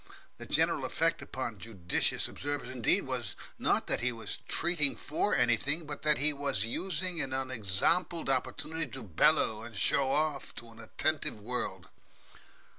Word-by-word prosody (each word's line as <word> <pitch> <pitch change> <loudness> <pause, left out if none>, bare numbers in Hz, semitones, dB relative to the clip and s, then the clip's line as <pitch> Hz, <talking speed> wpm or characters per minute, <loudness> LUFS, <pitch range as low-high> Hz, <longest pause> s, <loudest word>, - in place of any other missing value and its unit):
The - - -8
general - - +2
effect - - 0
upon - - -5
judicious 95 -6 0
observers, 145 -3 -4
indeed, 125 -4 +3
was - - -4 0.2
not - - +2
that - - 0
he 125 +1 +1
was 115 -1 -5
treating 165 -4 +2
for 155 +7 0
anything, 140 +7 +1
but 150 -1 -6
that 150 -1 +3
he 150 +2 +2
was 140 -8 -1
using 180 +6 -1
an 130 -1 -2
unexampled 130 - 0
opportunity 155 +4 -1
to - - -6
bellow 105 +3 +3
and 115 -1 -9
show 135 +6 +3
off 150 -1 -1
to 115 - -9
an 115 - -16
attentive 140 +2 -1
world. 105 -5 -2
135 Hz, 150 wpm, -31 LUFS, 115-150 Hz, 0.2 s, indeed